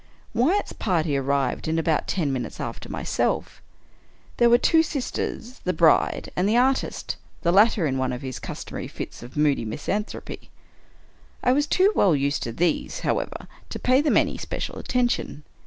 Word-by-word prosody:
Wyatt's 320 - +1
party 165 -7 0
arrived 140 0 0
in 160 +1 0
about 160 -1 +1
ten 155 -7 0
minutes 120 -4 -4
after - - -6
myself. - - -2 0.8
There 240 -1 +5
were 240 - +7
the - - -13
two 325 -1 +5
sisters, 260 -4 -4
the 185 - 0
bride, 165 -4 +3
and 185 +3 +1
the 225 - +3
artist 260 +2 0
— - - -32
the 170 - +3
latter 205 -1 +4
in 135 -3 0
one 130 -1 0
of 125 +1 -5
his 130 -2 -5
customary - - -6
fits - - -7
of 120 +4 -11
moody 145 -5 +2
misanthropy. 150 - -4 0.9
I 250 - +4
was 290 +3 +2
too 380 +6 +4
well 185 - +4
used 140 +1 0
to 115 - -3
these, 165 +6 -1
however, - - -2 0.2
to - - -5
pay 255 +2 +3
them 300 - +3
any - - +1
special - - -4
attention. 245 - -1
175 Hz, 170 wpm, -24 LUFS, -, 0.9 s, were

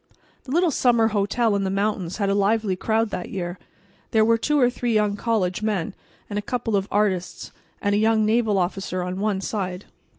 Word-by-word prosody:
The 260 - -8
little 345 +2 +3
summer 235 -4 +3
hotel 215 +2 +1
in 200 - 0
the 190 - -1
mountains 195 -3 -1
had 200 -2 0
a 195 - +2
lively 205 0 +1
crowd 220 +3 0
that 180 -1 -4
year. 175 -1 -5 0.5
There 220 -1 +3
were 230 0 +3
two 295 +4 +1
or 250 - +5
three 245 -1 -1
young 210 -1 +2
college 205 -4 -1
men 205 -5 -1 0.3
and 205 0 -3
a - - -3
couple 230 -1 -2
of 195 0 0
artists 195 -3 -1 0.3
and 205 -1 +2
a 205 - +2
young 220 0 +3
naval 220 -2 +2
officer 185 0 -2
on 180 +1 -4
one 200 -2 0
side. 185 -2 -4
210 Hz, 200 wpm, -23 LUFS, 195-225 Hz, 0.5 s, or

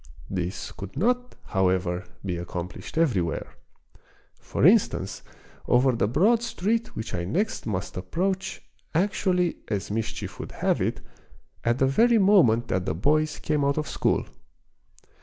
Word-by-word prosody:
This 95 0 -3
could 100 +6 -9
not, 245 - +1
however, 90 -2 0 0.2
be 90 -2 -1
accomplished 90 - -6
everywhere; 100 - 0 0.9
for - - -1
instance, - - +3 0.5
over 130 +2 +4
the 115 -4 +1
broad 200 - +3
street 230 0 -1
which 110 - -5
I 85 - -1
next 180 - -1
must 100 -3 -3
approach 185 - -2 0.3
actually, 180 -1 +1
as 100 -2 -3
mischief 110 +1 -4
would - - -7
have - - 0
it, - - -1 0.6
at 120 +1 +2
the 135 - +3
very 230 - +4
moment 185 - +5
that 90 0 -1
the 75 - 0
boys 155 - +1
came 150 -2 0
out 140 +1 +1
of 150 - -1
school. - - 0
130 Hz, 140 wpm, -26 LUFS, -, 0.9 s, moment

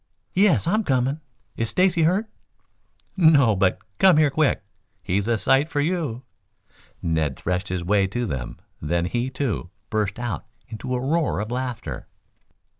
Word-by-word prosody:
"Yes. 195 0 +3
I'm 215 +6 +1
coming. 135 0 0 0.3
Is 115 -1 -1
Stacy 180 -2 +2
hurt?" 185 +7 +2 0.9
"No, 150 - +5
but 95 -1 +2 0.2
come 185 -5 +6
here 155 -2 +4
quick. 155 0 +1 0.4
Here's 100 +3 0
a 115 -1 +2
sight 135 +7 +2
for 155 -3 -1
you!" 145 -6 -1 0.8
Ned 80 -4 0
threshed 90 +3 -2
his 90 -1 -2
way 100 +2 +2
to 120 +5 -2
them, 65 - -4 0.2
then 85 +3 0
he, 120 +8 -1
too, 130 -9 -3 0.2
burst 105 -1 -1
out 120 -5 -4 0.2
into 120 +3 -4
a - - -1
roar 150 - 0
of 105 +2 -4
laughter. 125 -2 -4
125 Hz, 150 wpm, -23 LUFS, 100-155 Hz, 0.9 s, come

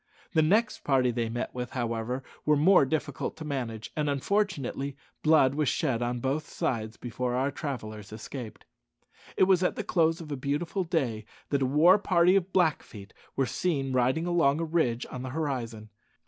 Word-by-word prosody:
The 160 - +4
next 210 +9 +2
party 130 -3 +3
they 115 -1 -2
met 120 +1 -4
with, 125 -1 -5
however, 120 +1 -2 0.2
were 150 - +4
more 160 0 +6
difficult 145 -2 -3
to 160 - -7
manage, 120 -6 -4
and, 150 -1 0
unfortunately, 140 -4 -1 0.2
blood 155 -4 +5
was 150 -1 +1
shed 130 -7 0
on 120 0 -1
both 140 +4 -2
sides 110 -2 -2
before 125 +1 -3
our 135 +3 +1
travellers 110 - -6
escaped. 110 0 -8 0.7
It - - +5
was 185 -1 +4
at 180 - +1
the - - -3
close 165 -2 +2
of 155 -3 -8
a - - -1
beautiful 145 +8 -2
day 135 -11 -1 0.3
that 140 -1 +1
a 130 - +2
war 165 +9 +6
party 180 -2 +4
of 190 -1 +1
Blackfeet 150 - -1 0.2
were 135 - +2
seen 135 -2 -1
riding 130 +6 +2
along 165 -4 +2
a 165 - -1
ridge 155 -8 0
on 125 - -5
the 130 - -5
horizon. 120 -7 -4
140 Hz, 175 wpm, -28 LUFS, 120-160 Hz, 0.7 s, more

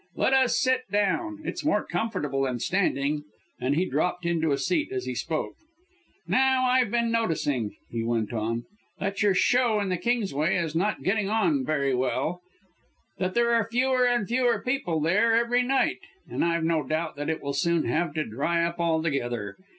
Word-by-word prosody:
"Let 265 - +2
us 255 -3 +3
sit 255 0 +1
down. 300 - 0
It's - - -4
more 210 -9 +1
comfortable 160 -8 -2
than 125 -2 -2
standing." 150 - 0 0.4
And 130 +3 0
he 175 +4 +2
dropped 180 +4 -1
into 165 -2 +1
a 140 - +2
seat 315 - 0
as 385 -1 -3
he - - -3
spoke. - - -3 0.7
"Now 260 0 +3
I've 250 -2 +3
been 235 +1 +1
noticing," 150 - -1 0.2
he 115 -1 -2
went 115 -1 -1
on, 115 +1 -2 0.3
"that 200 +1 -2
your 205 -2 +3
Show 240 +1 +3
in 200 -2 -1
the 180 - 0
Kingsway 190 - 0
is 165 -3 -2
not 195 +6 -1
getting 200 0 +1
on 265 +6 +2
very 140 - 0
well 130 +7 -1 0.8
that 185 0 -1
there 235 0 +3
are 230 -1 +2
fewer 250 +1 +2
and 240 -5 +1
fewer 245 0 +1
people 250 -11 -1
there 205 +8 +3
every 235 +1 +2
night, 270 +7 +1 0.3
and - - -2
I've 170 -1 +1
no 165 -1 +1
doubt 155 +2 -3
it 160 +2 -2
will 140 0 -2
soon 170 +3 +1
have 160 -1 -1
to 155 - 0
dry 160 +9 0
up 170 +1 -2
altogether. 140 -11 -1
180 Hz, 180 wpm, -26 LUFS, 150-235 Hz, 0.8 s, us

